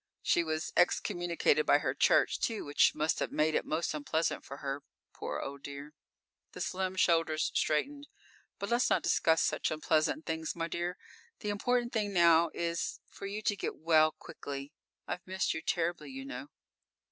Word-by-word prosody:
She 170 - +3
was 155 -1 -3
excommunicated 175 - +2
by - - +6
her - - -1
church, - - +3
too, 225 -2 -1
which 145 0 +3
must 155 +1 0
have - - -2
made 155 +1 +2
it - - +1
most 155 +1 -1
unpleasant 155 +2 -1
for 140 - -8
her, 140 0 -4 0.3
poor 75 - -4
old 140 0 -6
dear." 140 +2 -8 0.6
The - - -7
slim 185 0 -2
shoulders 165 -3 +2
straightened. 280 - 0 0.5
"But 200 - -4
let's 240 +1 +3
not - - +2
discuss 160 0 +3
such - - 0
unpleasant 155 0 +1
things, 160 -1 -3
my 165 -1 -2
dear. 175 +1 -3 0.4
The 210 - -3
important 240 +4 0
thing 210 -3 -1
now 170 -2 +5
is 170 0 -2
for 195 - -7
you 210 +2 -5
to 205 - +1
get - - -4
well 155 -1 +4
quickly. 140 0 -8 0.3
I've 180 - -5
missed 190 0 0
you 160 - -4
terribly, 170 +1 -1
you 270 0 -7
know." 285 +1 -7
170 Hz, 170 wpm, -32 LUFS, 155-195 Hz, 0.6 s, by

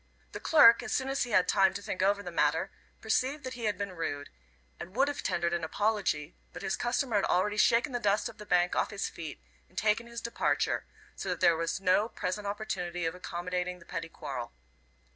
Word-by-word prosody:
The - - -6
clerk, 235 -7 +7
as - - -6
soon 265 0 0
as 270 -1 0
he - - -8
had 185 -5 +3
time 190 -1 +4
to 200 - -4
think 185 - -3
over 200 +1 +2
the 175 - -6
matter, 160 +4 +1 0.3
perceived 260 +6 0
that 255 0 -5
he 240 -2 -5
had 210 - 0
been 200 -1 -3
rude, 145 -5 -4 0.5
and 180 +3 -9
would 270 +3 +3
have 290 - -3
tendered 170 0 0
an 170 -1 -1
apology, 185 -4 0 0.2
but - - -8
his 190 - 0
customer 240 -2 0
had 200 - +2
already 205 +3 +1
shaken 235 +6 +4
the 245 - -1
dust 205 -2 +1
of - - -11
the 210 - -8
bank 175 0 +3
off - - +1
his 200 -2 -3
feet 160 -4 -8 0.3
and 185 - -26
taken 220 +2 +1
his 235 0 -6
departure, 235 - 0 0.3
so 195 - -5
that 180 -2 -2
there 170 - +5
was 165 +3 -2
no 195 +4 +3
present 205 0 -3
opportunity 180 -5 -3
of 165 - -1
accommodating 180 0 -3
the 170 - -17
petty 165 0 -5
quarrel. - - -6
195 Hz, 220 wpm, -30 LUFS, 175-225 Hz, 0.5 s, clerk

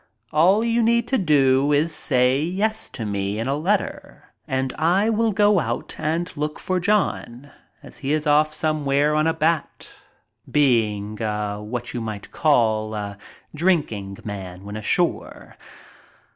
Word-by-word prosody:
All 185 +8 +4
you 235 0 +1
need 235 +1 +2 0.2
do 135 -1 +4
is 150 +3 +2
say 130 -1 +2
yes 200 +7 -1
to 115 - -6
me 100 0 -2
in 115 +3 -2
a 135 - 0
letter 185 +7 -3
and 130 0 -1
I 185 +8 +2
will 225 0 +1
go 205 -1 +4
out 120 -5 -3
and 165 +3 -2
look 150 +1 -3
for 185 -1 -1
John 170 - -1 0.3
as - - -11
he 140 0 -3
is 155 0 0
off 150 +1 +3
somewhere 150 -2 +1
on 155 +1 +2
a 160 - +2
bat, 160 +1 -1 0.6
being 110 -7 +1
a 105 -1 -2
what 120 +3 -5
you 120 - -3
might 110 -2 -6
call 110 -7 +1
a 100 -1 -5 0.4
drinking 145 - 0
man 95 -3 -7
when 100 +1 -7
ashore. 110 -1 -2
145 Hz, 145 wpm, -22 LUFS, 110-165 Hz, 0.6 s, All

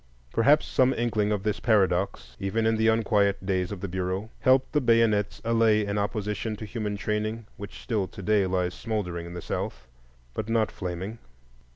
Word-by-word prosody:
Perhaps 145 +6 +4
some 130 0 +2
inkling 110 -3 0
of 105 -2 -1
this 105 -1 -1
paradox, 95 - +1
even 100 +4 0
in 115 0 +3
the 110 0 +2
unquiet 105 -3 +2
days 95 -1 0
of 100 -3 -6
the 100 - -3
Bureau, 95 +4 -3
helped 130 0 +3
the 150 - +3
bayonets 115 -4 +2
allay 115 -2 +3
an 100 0 -1
opposition 105 +2 -2
to 110 - -7
human 105 -1 -3
training 110 +2 -2
which 100 +1 -9
still 105 -6 -1
to 100 0 -10
day 105 -1 +3
lies 90 -1 0
smouldering 90 -7 -3
in 85 - -8
the 90 - -6
South, 65 0 -4 0.5
but 110 - -4
not 115 -2 +2
flaming. 95 +5 -5
105 Hz, 180 wpm, -27 LUFS, 95-115 Hz, 0.5 s, Perhaps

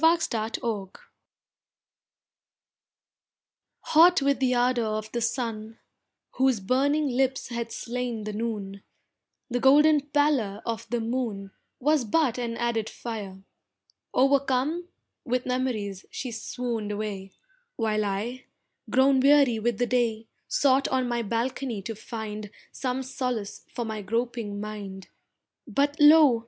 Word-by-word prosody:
AN - - +9
AUGUST 330 -5 -3
NIGHT 220 -3 -3 2.8
Hot 345 +3 +6
with 280 0 +2
the 255 -1 +2
ardour 245 0 +2
of 215 0 -6
the 240 - -2
sun, 225 -2 -3 0.6
Whose 260 -4 +3
burning 280 +8 +1
lips 265 +1 0
had 235 -1 -4
slain 240 -2 -4
the 210 0 -4
noon, 205 -3 -4 0.7
The 245 - 0
golden 295 +4 +6
pallor 280 -9 +1
of 230 -1 -4
the 240 -1 -1
moon 225 -5 -3 0.3
Was 295 +1 +2
but 250 +1 +1
an 230 -1 -3
added 230 -2 -1
fire, 200 -5 -7 0.7
o'ercome 275 +4 +2 0.4
With 250 0 -1
memories 235 -7 -2
she 255 - -5
swooned 225 -1 -4
away, 205 -2 -5 0.4
While 215 -2 0
I, 215 +6 -3 0.4
grown 265 +1 +4
weary 275 -4 +5
with 235 0 0
the 245 - +1
day 235 -3 0 0.2
Sought 275 -1 +3
on 260 -1 0
my 240 -1 -1
balcony 230 0 -2
to 225 - -4
find 215 -1 -6 0.2
Some 260 0 -2
solace 250 -5 -4
for 240 - -3
my 220 -1 -4
groping 230 -1 -2
mind, 205 -2 -7 0.6
But 285 +1 +1
lo! 295 -5 +7
240 Hz, 125 wpm, -26 LUFS, 215-265 Hz, 2.8 s, AN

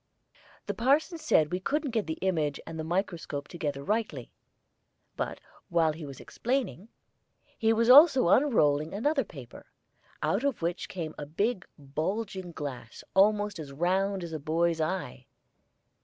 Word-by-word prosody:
The - - -2
parson 290 +8 +2
said 170 - +3
we 180 - -1
couldn't 290 +7 -1
get 220 -5 -1
the 160 - -3
image 155 -6 0
and 165 -1 -7
the - - -2
microscope 165 -4 -3
together 145 -5 -4
rightly; 205 - -2 0.8
but - - -3 0.3
while 165 -2 +3
he 155 -1 -8
was 135 -2 -9
explaining, 240 -5 -3 0.7
he 225 0 +2
was 230 +1 +2
also 265 - +8
unrolling 160 - +3
another 275 +6 +1
paper, 135 - -12 0.6
out 205 +6 +1
of 280 -11 -1
which 170 +1 -2
came 165 -4 -5
a 145 - -6
big 200 +6 -1
bulging 180 +6 -3
glass 135 -7 -7
almost 205 0 +3
as 145 -3 -7
round 185 +5 0
as 170 -1 -6
a 155 - -3
boy's 165 +2 0
eye. 155 -7 -3
180 Hz, 145 wpm, -29 LUFS, 155-225 Hz, 0.8 s, also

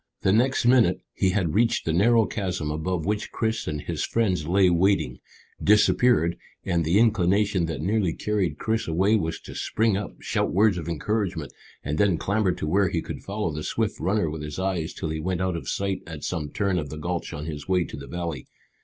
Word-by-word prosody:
The 95 - +3
next 125 +3 +2
minute 120 -7 +4
he 95 - +1
had 90 -4 0
reached 115 +3 +2
the 80 - 0
narrow 115 +5 +4
chasm 90 -8 -3
above 80 +2 -2
which 105 +1 -2
Chris 110 0 -2
and 75 -1 -2
his - - -3
friends 95 -9 0
lay 95 +2 +4
waiting, 90 -7 +2 0.4
disappeared, 105 -3 +4 0.3
and 85 -3 +1
the 85 +5 +2
inclination 100 -4 +3
that 80 -2 -4
nearly 100 -2 +1
carried 105 -4 -1
Chris 110 0 -1
away 95 +7 +3
was 80 -6 -1
to - - -10
spring 110 -2 0
up, 100 +1 -5
shout - - -1
words 100 -1 +3
of 85 - -5
encouragement, 90 -2 -2 0.3
and 75 +2 -2
then 100 -5 +3
clamber 100 +1 +1
to 85 - -4
where 95 +5 +2
he 85 -4 -2
could - - -6
follow 100 -3 -3
the 75 - -4
swift 110 +6 -2
runner 100 -2 +1
with 75 0 -5
his 75 0 -6
eyes 95 -4 -1
till 80 - -4
he 80 - -3
went 90 +2 -2
out 95 -1 0
of 85 - -5
sight 100 -1 -1
at 80 -3 -8
some 80 -5 -3
turn 95 0 0
of 75 -3 -5
the 75 - -7
gulch 85 +3 -3
on 75 +1 -6
his 75 -3 -6
way 90 -2 +2
to - - -8
the 70 0 -9
valley. 85 -3 -5
95 Hz, 210 wpm, -25 LUFS, 80-105 Hz, 0.4 s, minute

